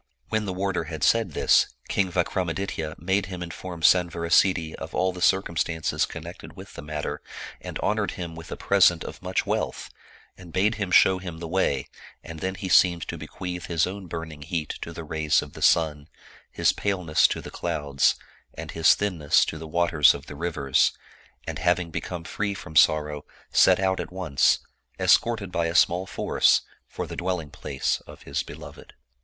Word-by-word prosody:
When 110 -1 0
the 95 - -3
warder 95 -2 -1
had 80 -3 -6
said 115 -4 +3
this. - - +3
King 95 -2 0
Vikramaditya 85 -2 -2
made 95 +3 0
him 90 -2 -6
in 85 - -7
form 90 -1 -8
Sanvarasiddhi 85 0 +3
of 80 - -7
all 95 0 +1
the 90 - -9
circumstances 85 -3 +1
connected 85 -1 -9
with 95 +2 -11
the - - -8
matter, 75 0 -4 0.4
and - - -6
honored - - 0
him 85 -2 -6
with 80 -1 -10
a - - -5
present 90 -4 +4
of - - -9
much - - -1
wealth, - - -2 0.4
and 90 -2 -13
bade 100 +6 +2
him 100 - -1
show 95 +1 +5
him 90 -3 -7
the 85 0 -6
way, 80 -6 0 0.4
and 85 -1 -8
then 95 +3 -3
he 95 +1 -5
seemed 90 -1 +4
to - - -3
be 80 - -8
queath 90 0 -6
his 85 -2 +2
own 95 0 -7
burning 80 -2 -7
heat 80 0 -4
to 85 - -6
the 85 0 -7
rays 80 -1 +1
of - - -12
the - - -10
sun, 75 -3 +2 0.4
his - - +2
pale 100 -2 -2
ness 75 -2 +4
to - - -3
the - - -9
clouds, 75 -5 0 0.4
and - - -7
his 80 -1 +5
thinness 85 -8 +2
to 80 - -5
the 80 - -8
waters 80 -2 +4
of 70 - -9
the 75 - -9
riv 85 +1 -4
ers, 70 -1 +3 0.5
and - - -5
having 90 0 +1
become 85 +1 -5
free 100 +3 -3
from 80 -5 -10
sorrow, 75 -1 +3 0.3
set 95 -1 +5
out 95 -1 +1
at - - -5
once, 90 -8 +2 0.4
escorted 110 -5 +2
by 85 -1 0
a 85 - -4
small 90 +2 +3
force, - - +2 0.3
for - - -5
the - - -8
dwelling 85 -4 -3
place 70 -3 -2
of - - -13
his 70 0 -2
be - - -9
loved. - - -12
85 Hz, 190 wpm, -25 LUFS, 80-95 Hz, 0.5 s, show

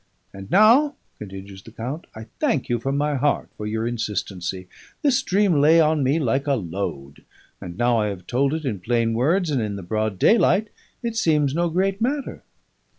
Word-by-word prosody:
And 95 0 -10
now,' 240 +9 +5 0.2
continues 95 -1 -9
the - - -13
count, 125 +9 -6
'I 110 0 -8
thank 245 - 0
you 120 -1 0
from 135 +4 -2
my 150 +1 0
heart 145 +2 0
for 105 - -6
your 110 +1 -2
insistency. 95 -5 -4 0.4
This 265 -3 +3
dream 195 - +2
lay 160 +3 +6
on 155 -1 +3
me 135 +4 +2
like 135 -1 0
a 140 - +3
load; 85 - -5 0.4
and 85 0 -8
now 120 -1 +2
I 105 - +1
have 95 -3 -6
told 135 - 0
it 160 -2 -5
in 110 -7 -2
plain 115 +3 0
words 160 +9 +1
and 135 -4 0
in 105 -2 -3
the 100 - -7
broad 110 +2 -2
daylight, 210 - +3 0.3
it 230 -1 -3
seems 150 -9 +2
no 170 +2 +1
great 190 +4 0
matter.' 275 +4 -2
135 Hz, 190 wpm, -23 LUFS, 105-170 Hz, 0.4 s, lay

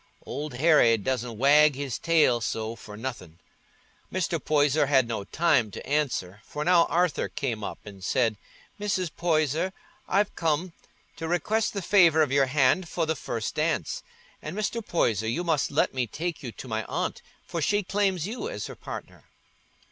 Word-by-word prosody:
Old 145 -2 -5
Harry 130 -5 +5
doesna 125 +2 -2
wag 145 +5 +5
his 140 -2 -4
tail 155 -8 +3
so 110 0 -3
for 105 -2 -11
nothin'." 110 -9 -6 0.7
Mr. 170 -3 -1
Poyser 145 -1 +3
had 130 -4 +4
no 110 -3 -3
time 150 -6 +2
to - - -9
answer, 125 -10 -1
for 150 +5 -5
now 175 -1 +5
Arthur 175 -2 +1
came 125 -7 -3
up - - -4
and 100 -2 -11
said, 115 0 +1 0.4
"Mrs. 190 -5 -1
Poyser, 160 +1 +1 0.3
I'm 200 +2 +3
come 165 +2 -1 0.4
to 165 - -4
request 210 +6 0
the 200 -2 -3
favour 170 -5 +5
of 145 - -2
your 135 -1 +3
hand 145 +6 +2
for 165 - -1
the 160 0 0
first 115 -5 -4
dance; 165 - -1 0.4
and, 155 +6 -6
Mr. 220 +2 -2
Poyser, 110 - 0
you 140 +10 -1
must 160 -5 +1
let - - +1
me 125 -2 -1
take 165 +6 -4
you 125 -5 -6
to 130 - -10
my 110 -1 -2
aunt, - - -3 0.2
for 170 - -4
she 205 +6 +1
claims 190 -3 0
you 250 - -4
as - - -5
her - - -8
partner." - - -9
150 Hz, 170 wpm, -27 LUFS, 125-175 Hz, 0.7 s, Harry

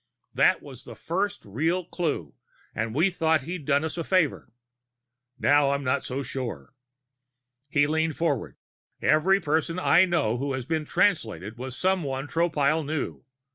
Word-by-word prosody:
That - - +3
was 135 -3 -11
the 120 - -10
first 185 - -2
real 160 - -1
clue 150 - -3 0.4
and 115 +1 -3
we 175 +6 +3
thought 160 -4 +1
he'd 165 0 -6
done 140 0 +3
us 160 +2 -3
a - - -1
favor. 160 -8 +1 0.9
Now 145 +1 +4
I'm 140 0 -2
not 130 +2 0
so 135 +2 -3
sure." 120 - -5 1.0
He 145 0 +3
leaned 160 +1 0
forward. 150 -8 -1 0.4
"Every 190 +6 +3
person 160 +1 0
I 185 - +5
know 170 -12 +1
of 120 - -3
who 140 - -2
was 130 -3 -3 0.2
Translated 110 - 0
was 130 +1 -7
someone 150 -8 0
Tropile 160 -1 +1
knew. 150 -2 -4
145 Hz, 150 wpm, -26 LUFS, 130-165 Hz, 1.0 s, I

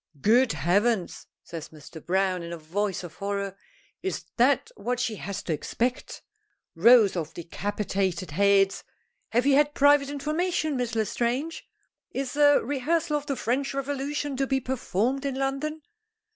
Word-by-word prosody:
"Good 240 - +4
heavens!" 185 +6 0 0.2
says 165 -2 -8
Mr. 155 +1 -12
Browne, 185 0 +1
in 170 0 -7
a 170 - -5
voice 185 +5 -2
of 165 -2 -10
horror. 200 -1 -3 0.5
"Is 380 - -3
that 255 +3 +3
what 240 +4 -2
she 230 -3 -1
has 200 0 -5
to 165 - -1
expect? 240 +10 -3 0.5
Rows 215 +2 +6
of 165 -4 -4
decapitated 190 0 -2
heads! 195 +3 +3 0.5
Have 240 +2 +1
you 280 - +4
had 295 +1 +3
private 285 0 +5
information, 310 +2 -1
Miss 245 -2 -2
L'Estrange? 240 +8 -1 0.4
Is 270 0 -4
a 290 -1 +5
rehearsal 300 +4 0
of 295 0 -3
the 275 - -1
French 270 +4 -1
Revolution 285 +1 -2
to 270 0 0
be 270 0 +1
performed 255 0 -1
in 275 -2 -2
London? 275 +3 -2
245 Hz, 145 wpm, -26 LUFS, 195-280 Hz, 0.5 s, Rows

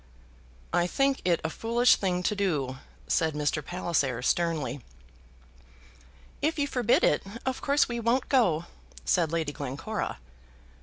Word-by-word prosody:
"I 175 - +3
think 275 +6 +1
it 175 -2 +3
a 160 - -2
foolish 235 +5 +3
thing 180 -2 -1
to 210 - +1
do," 150 -10 -1 0.3
said 160 -2 +1
Mr. 150 0 0
Palliser, 145 -8 -1
sternly. 150 -5 0 1.6
"If 310 +3 +1
you 285 - +1
forbid 250 -4 +2
it, 150 - +3 0.2
of 260 0 -2
course 285 +1 +3
we 235 -1 -3
won't 235 +3 +1
go," 175 - +2 0.4
said 170 -4 +2
Lady 165 -3 -1
Glencora. 145 +10 -4
175 Hz, 135 wpm, -28 LUFS, 150-235 Hz, 1.6 s, I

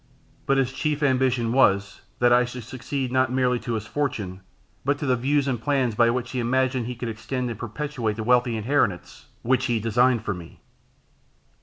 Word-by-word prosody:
But 135 - +3
his 135 -1 +1
chief 150 +1 -1
ambition 130 -4 +2
was, 100 -7 +2 0.2
that 120 0 +4
I 125 +1 +5
should 125 0 -6
succeed 130 +2 -4
not 130 -1 +2
merely 125 -1 +1
to 120 - -4
his 110 -2 -3
fortune, 105 -9 -3 0.4
but 145 +1 +1
to 145 - -4
the 130 -2 +3
views 140 +3 +1
and 125 -4 -1
plans 130 -2 +1
by 115 +2 +4
which 125 +1 -2
he 130 - -2
imagined 130 0 0
he 125 - -4
could 120 0 -5
extend 120 +3 -3
and 115 - -7
perpetuate 120 -1 -3
the 110 - -4
wealthy 120 0 +2
inheritance 105 -7 -1 0.2
which 130 +1 +2
he 120 -3 +1
designed 115 +1 +2
for 100 - -1
me. 85 -2 -11
125 Hz, 190 wpm, -24 LUFS, 115-130 Hz, 0.4 s, I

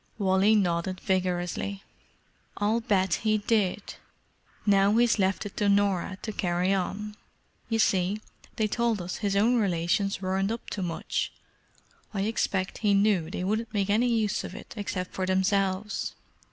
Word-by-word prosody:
Wally 195 +1 +3
nodded 185 -1 0
vigorously. 185 +1 -1 0.7
"I'll 215 +3 +1
bet 190 -5 +1
he 215 -1 +2
did. 210 -2 0 0.7
Now 200 +1 +4
he's 235 -2 +3
left 190 +2 +1
it 205 - -7
to 205 - +2
Norah 200 -2 +1
to 220 - -3
carry 180 -1 0
on. 205 +3 -3 0.5
You 225 - +1
see, 195 -1 +2 0.4
they 220 - +1
told 230 0 0
us 180 0 -4
his 200 -2 -1
own 230 +5 +4
relations 195 0 +1
weren't 190 +2 0
up 230 - -5
to 200 - -3
much. 170 -3 -2 0.8
I 195 - 0
expect 195 -3 -1
he 205 -2 +3
knew 195 -5 +2
they 180 - -4
wouldn't 215 +3 -2
make 200 0 +1
any 230 +4 +3
use 220 -4 +1
of - - -7
it - - -10
except 190 -4 -4
for 185 -1 -2
themselves. 190 +2 0
200 Hz, 155 wpm, -27 LUFS, 185-215 Hz, 0.8 s, Now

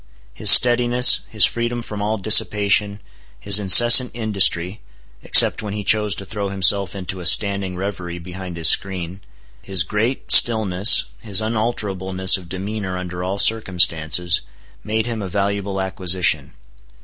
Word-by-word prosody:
His - - +1
steadiness, 120 0 +4
his 105 -5 +3
freedom 120 0 -5
from 105 -2 -9
all 105 +2 -3
dissipation, 105 0 +1 0.4
his 100 0 +3
incessant 120 +6 +4
industry 100 -4 -1 0.4
(except - - +5
when 105 -2 -8
he 105 - -7
chose 105 -1 +1
to 100 - -10
throw 100 0 -6
himself 100 0 0
into 95 -1 -7
a 90 - -10
standing 100 -2 +1
revery 90 -2 -7
behind 90 0 -11
his 80 -2 +2
screen), 95 +1 -2 0.4
his 95 -3 -1
great 110 +8 -5
stillness, 110 -2 +4 0.2
his 105 -4 -1
unalterableness 100 -4 -1
of 90 -3 -9
demeanor 95 0 -7
under 90 -1 -8
all 95 +2 -5
circumstances, 90 -5 +1 0.4
made 110 +1 -4
him 115 -2 -6
a 95 - -7
valuable 100 0 -4
acquisition. 90 -6 -3
100 Hz, 135 wpm, -17 LUFS, 90-110 Hz, 0.4 s, except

